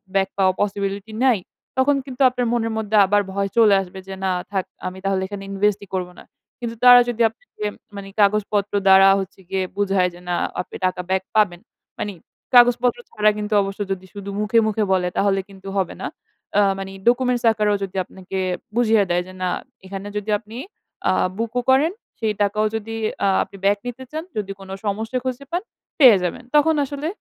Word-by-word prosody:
Back 190 Hz, -1 st, +2 dB
পাওয়া 190 Hz, -1 st, +3 dB
possibility 200 Hz, +1 st, -2 dB
নাই।" 250 Hz, -4 st, +5 dB, 0.4 s
তখন 270 Hz, +2 st, +4 dB
কিন্তু 260 Hz, -1 st, -8 dB
আপনার 250 Hz, -1 st, -2 dB
মনের 225 Hz, -1 st, 0 dB
মধ্যে 220 Hz, -1 st, -1 dB
আবার 205 Hz, +2 st, +3 dB
ভয় 200 Hz, 0 st, -1 dB
চলে 220 Hz, -3 st, +6 dB
আসবে 190 Hz, 0 st, -9 dB
যে, 195 Hz, -, -6 dB
"না! 190 Hz, -, +2 dB, 0.2 s
থাক 190 Hz, -2 st, -1 dB, 0.2 s
আমি 185 Hz, +1 st, -6 dB
তাহলে 195 Hz, -1 st, +1 dB
এখানে 200 Hz, 0 st, -7 dB
invest 205 Hz, +1 st, +1 dB
ই -, -, -28 dB
করবনা।" 180 Hz, -1 st, -4 dB, 0.4 s
কিন্তু 235 Hz, -1 st, -4 dB
তারা 245 Hz, 0 st, +10 dB
যদি 240 Hz, -1 st, -2 dB
আপনাকে 220 Hz, -, -7 dB, 0.2 s
মানে 200 Hz, -1 st, -7 dB
কাগজপত্র 205 Hz, 0 st, +2 dB
দ্বারা 190 Hz, 0 st, +8 dB
হচ্ছে 195 Hz, 0 st, -7 dB
গিয়ে 190 Hz, 0 st, 0 dB
বুঝায় 195 Hz, -2 st, +2 dB
যে 175 Hz, -, -13 dB
না 175 Hz, -, +1 dB, 0.3 s
আপনি -, -, -11 dB
টাকা 185 Hz, 0 st, 0 dB
ব্যাক 190 Hz, 0 st, +1 dB
পাবেন। 200 Hz, -5 st, +3 dB, 0.4 s
মানে 205 Hz, -, -3 dB, 0.4 s
কাগজপত্র 245 Hz, 0 st, +5 dB
ছাড়া 215 Hz, 0 st, +3 dB
কিন্তু 210 Hz, 0 st, -3 dB
অবশ্য 195 Hz, 0 st, -4 dB
যদি 190 Hz, -1 st, -3 dB
শুধু 200 Hz, -1 st, -7 dB
মুখে, 210 Hz, +2 st, +3 dB
মুখে 215 Hz, 0 st, 0 dB
বলে 180 Hz, -1 st, +1 dB
তাহলে 195 Hz, -1 st, +2 dB
কিন্তু 195 Hz, 0 st, -13 dB
হবে 185 Hz, -, -2 dB
না। -, -, -2 dB, 0.5 s
আ -, -, +6 dB, 0.2 s
মানে 195 Hz, 0 st, -6 dB, 0.2 s
documents 250 Hz, 0 st, +1 dB
আকারেও 210 Hz, -2 st, +1 dB
যদি 195 Hz, -1 st, -6 dB
আপনাকে 190 Hz, +1 st, -7 dB, 0.4 s
বুঝিয়ে 225 Hz, -3 st, +4 dB
দেয় 175 Hz, 0 st, +1 dB
যে, 185 Hz, -, -11 dB
"না! 180 Hz, -, +1 dB, 0.4 s
এখানে 195 Hz, +1 st, -6 dB
যদি 210 Hz, +1 st, -5 dB
আপনি 220 Hz, +1 st, -11 dB, 0.5 s
আ -, -, +5 dB, 0.3 s
বুক 230 Hz, 0 st, -2 dB
ও -, -, 0 dB
করেন, 275 Hz, +5 st, +4 dB, 0.3 s
সেই 220 Hz, -2 st, 0 dB
টাকাও 205 Hz, +1 st, +2 dB
যদি 225 Hz, +1 st, -4 dB, 0.3 s
আ -, -, +4 dB, 0.2 s
আপনি -, -, -15 dB
ব্যাক 200 Hz, +1 st, +4 dB
নিতে 245 Hz, +2 st, -6 dB
চান, 315 Hz, +1 st, -4 dB
যদি 200 Hz, -2 st, -2 dB
কোন 195 Hz, 0 st, -12 dB, 0.2 s
সমস্যা 220 Hz, +4 st, -2 dB
খুঁজে 260 Hz, +1 st, -4 dB
পান, 350 Hz, +1 st, 0 dB, 0.4 s
পেয়ে 250 Hz, -8 st, +9 dB
যাবেন।" 180 Hz, +7 st, -3 dB
তখন 315 Hz, +2 st, +5 dB
আসলে 285 Hz, +2 st, -5 dB
205 Hz, 190 wpm, -22 LUFS, 195-235 Hz, 0.5 s, তারা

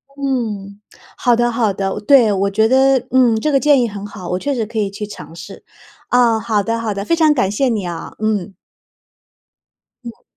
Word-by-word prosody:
嗯， 220 Hz, -8 st, -3 dB, 0.4 s
好 245 Hz, -1 st, +2 dB
的 240 Hz, 0 st, +1 dB
好 230 Hz, -4 st, 0 dB
的， 195 Hz, +1 st, -3 dB
对， 235 Hz, -1 st, +5 dB
我 195 Hz, 0 st, 0 dB
觉 220 Hz, +2 st, +2 dB
得， 265 Hz, +1 st, +4 dB
嗯， 250 Hz, -3 st, +4 dB
这 305 Hz, +7 st, -1 dB
个 275 Hz, -, +3 dB
建 290 Hz, -3 st, +4 dB
议 235 Hz, -, +1 dB
很 200 Hz, -1 st, -8 dB
好， 190 Hz, -4 st, -9 dB
我 180 Hz, -, -1 dB
确 285 Hz, +8 st, -2 dB
实 235 Hz, -4 st, -2 dB
可 225 Hz, +1 st, -8 dB
以 205 Hz, -2 st, -1 dB
去 205 Hz, +1 st, -6 dB
尝 170 Hz, -5 st, -11 dB
试， 170 Hz, +4 st, -11 dB, 0.5 s
啊， 240 Hz, -2 st, +3 dB
好 220 Hz, -2 st, 0 dB
的 230 Hz, +3 st, -2 dB
好 225 Hz, -2 st, -2 dB
的， 200 Hz, 0 st, -4 dB
非 335 Hz, -, +1 dB
常 315 Hz, -2 st, +4 dB
感 195 Hz, -8 st, 0 dB
谢 255 Hz, +5 st, 0 dB
你 210 Hz, -5 st, -2 dB
啊， 170 Hz, -1 st, -6 dB
嗯。 210 Hz, -3 st, -2 dB, 1.5 s
嗯。 235 Hz, -1 st, -11 dB
220 Hz, 215 characters per minute, -17 LUFS, 200-250 Hz, 1.5 s, 对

